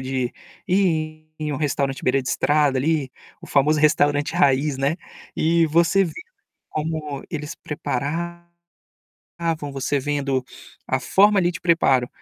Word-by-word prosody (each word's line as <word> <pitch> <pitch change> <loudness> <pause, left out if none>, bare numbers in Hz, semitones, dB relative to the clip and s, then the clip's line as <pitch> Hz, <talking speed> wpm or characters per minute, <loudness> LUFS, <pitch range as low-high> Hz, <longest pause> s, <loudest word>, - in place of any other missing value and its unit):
de 130 -1 -2 0.4
ir 155 -4 0
em 150 -1 -2
um - - -2
restaurante 140 -2 -1
beira 135 +1 +2
de 125 - -5
estrada 145 +1 +2
ali, 145 -2 0 0.3
o - - -9
famoso 150 +2 +3
restaurante 145 -1 +3
raiz, 140 -3 +2
né, 140 +5 +1 0.4
e 165 +1 +3
você 170 +5 +3
vê 165 - -5 0.6
como 155 -2 -4
eles 150 +1 -5
preparavam, 170 +5 -5 1.0
você 135 +1 -1
vendo 140 -2 -1 0.4
a - - 0
forma 205 +1 +4
ali 175 -1 +2
de 180 +2 -7
preparo, 135 -8 +3
150 Hz, 135 wpm, -22 LUFS, 135-165 Hz, 1.0 s, forma